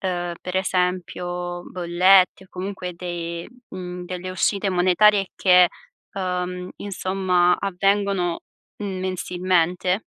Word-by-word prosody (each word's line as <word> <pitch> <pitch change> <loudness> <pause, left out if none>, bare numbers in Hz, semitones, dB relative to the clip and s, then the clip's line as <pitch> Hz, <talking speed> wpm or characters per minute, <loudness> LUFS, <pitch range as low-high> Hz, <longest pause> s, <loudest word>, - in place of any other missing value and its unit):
Uhm, 175 -2 -2
per 185 0 -4
esempio 180 -1 -2
bollette, 185 +2 +4
o - - -20
comunque 185 -1 -5
de 170 -1 -5 0.2
mhmm, 180 -1 -7
delle 185 0 -5
uscite 195 +2 0
monetarie 185 +2 +4
che, 180 -2 +6 0.4
uhm, 180 -1 -3
insomma, 185 -2 +1
avvengono 195 -2 0 0.4
mensilmente? 185 -1 0
180 Hz, 95 wpm, -23 LUFS, 180-190 Hz, 0.4 s, che